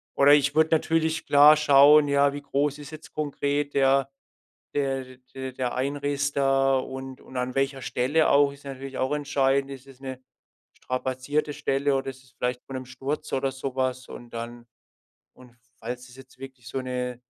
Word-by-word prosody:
oder 140 +1 +6
ich 145 0 +3
würde 160 0 +4
natürlich 160 0 +1
klar 145 +2 +7
schauen, 145 0 +6
ja, 140 0 +3
wie 145 - -6
groß 140 +1 -1
ist 145 +1 -10
jetzt 155 0 -11
konkret 145 -1 -2
der 135 0 +3 0.6
der 135 -2 -1
d 130 0 -15 0.2
d 130 0 -5
der 125 -1 -3
Einriss 140 +1 -1
da 135 -1 +2
und 130 0 -7
und 130 - -10
an 125 0 -2
welcher 135 0 0
Stelle 140 +7 +1
auch. 140 0 +4
Ist 140 0 -16
natürlich 135 0 -7
auch 130 +3 0
entscheidend, 140 -1 +1
ist 135 0 -10
es 135 -1 -16
'ne 130 -1 -7 0.5
strapazierte 130 +4 -2
Stelle 140 0 0
oder 135 0 -2
ist 130 0 -11
es 130 - -23
vielleicht 125 0 -3
von 135 - -8
'nem 130 0 -5
Sturz, 135 +4 -5
oder 135 0 0
so 135 0 -6
was. 130 -1 -2
Und 120 -1 -11
dann 120 +1 -7 0.7
und 125 -1 -18 0.2
falls 125 +2 -7
es 125 - -15
jetzt 135 -1 -16
wirklich 130 -3 -11
so 135 - -3
'ne 125 -1 -4
135 Hz, 185 wpm, -26 LUFS, 130-145 Hz, 0.7 s, klar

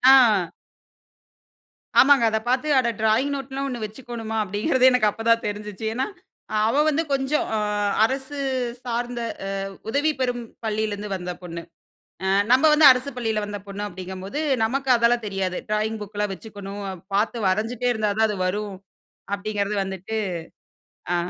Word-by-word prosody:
ஆ. 210 -10 +4 1.5
ஆமாங்க. 275 -3 +6
அத 220 - +1
பாத்து 260 +4 +1
அட 235 - +1
ட்ராயிங் 225 +6 +2
நோட்லாம் 270 0 -4
ஒண்ணு 240 -4 -4
வெச்சுக்கோணுமா? 225 0 -6
அப்டீங்குறதே 235 - +2
எனக்கு 215 -4 +3
அப்பதான் 230 +2 +1
தெரிஞ்சுச்சு. 210 0 -5
ஏன்னா, 255 +3 0 0.6
அவ 250 - +1
வந்து 310 +2 +1
கொஞ்சம், 275 +2 +1
அ - - +1 0.5
அரசு 265 +3 -3 0.5
சார்ந்த 240 0 -2 0.3
அ - - -3 0.4
உதவி 290 +6 +2
பெறும் 245 -1 -1 0.2
பள்ளியிலருந்து 210 -1 -2
வந்த 180 -1 -4
பொண்ணு. 170 -1 -6 0.6
அ - - +1 0.2
நம்ப 260 +4 +5
வந்து 300 -1 +7
அரசு 255 +3 -3
பள்ளியில 225 -3 -1
வந்த 205 0 -5
பொண்ணு 200 +1 -5
அப்டீங்கும்போது 190 - -6 0.2
நமக்கு 270 +4 -1
அதெல்லாம் 235 0 +2
தெரியாது. 195 -2 -2
ட்ராயிங் 215 +1 0
புக்கெலாம் 205 0 -3
வெச்சுக்கணும். 200 -1 -8
அ 190 - -5 0.2
பாத்து 215 +1 +1
வரஞ்சுட்டே 225 +5 0
இருந்தா 215 -2 0
தான் 220 - +4
அது 210 -2 -3
வரும் 205 +2 -2 0.6
அப்டீங்கிறது 205 0 -2
வந்துட்டு 190 +3 -5 1.0
அ. - - +3
220 Hz, 140 wpm, -24 LUFS, 205-250 Hz, 1.5 s, வந்து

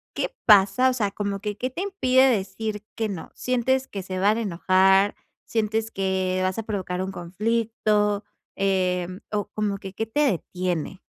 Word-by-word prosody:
qué - - -2
pasa? 210 +4 +6
O - - 0
sea, 210 -5 0
¿cómo 200 -1 -3
que 210 -1 -4
qué 255 - -2
te 350 - -5
impide 265 -10 +3
decir 210 0 -2
que 220 -2 -1
no? 185 -5 -6
¿Sientes 260 +1 0
que 200 - -5
se 185 0 -5
van 205 +4 +3
a - - -1
enojar? 190 +1 +3 0.3
¿Sientes 220 0 -1
que 190 -2 0
vas 185 0 0
a 225 - -2
provocar 190 -4 -3
un 190 +1 -3
conflicto? 210 +2 0 0.3
Em, 185 -1 0
o, 205 -1 -1
¿cómo 205 -2 -1
que 190 0 -8
qué 225 - -2
te 225 +6 -3
detiene? 185 - -1
205 Hz, 170 wpm, -24 LUFS, 190-225 Hz, 0.3 s, pasa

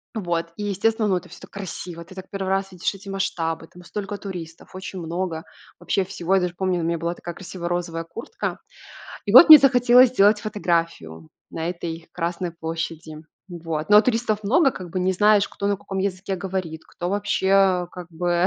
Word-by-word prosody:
вот, 175 -5 -2
и 210 - -4
естественно, 215 +2 0
ну, 185 - +2
это 180 0 -9
всё - - -13
так - - -13
красиво. 180 -3 -7
Ты 175 +3 -15
так 190 0 -9
1 195 -1 -3
раз 195 0 -1
видишь 180 +2 -2
эти 195 +1 -11
масштабы, 165 -4 -2
там 180 +2 -16
столько 205 +2 -5
туристов, 175 -5 -8
очень 190 0 -7
много 170 -1 -3 0.4
вообще 195 - 0
всего. 185 -1 -1
Я 190 - +3
даже 180 -1 -2
помню, 185 -1 0
у - - -2
меня 170 +1 0
была 170 +1 -2
такая 175 0 -8
красивая 180 -2 -7
розовая 175 -1 -2
куртка. 225 +8 -6 0.7
И 200 - -1
вот 260 +9 +10
мне 310 -1 +13
захотелось 250 -1 +6
сделать 210 -3 +4
фотографию 170 - -2 0.2
на 165 +1 -4
этой 170 -2 -6
Красной 175 +1 -3
площади. 160 -1 -6 0.3
Вот, 165 -2 -5
но 210 0 +9
туристов 225 -2 0
много, 270 - +4
как 185 -5 -8
бы 185 - -2
не 185 +1 +1
знаешь, 205 +1 +4
кто 200 - -5
на 200 0 +1
каком 195 0 -6
языке 190 0 -2
говорит, 180 -4 -5
кто 175 - -5
вообще, 205 -1 -1
э, 190 -2 +4
как 180 -2 -9
бы 175 +1 +1
185 Hz, 195 wpm, -23 LUFS, 170-200 Hz, 0.7 s, мне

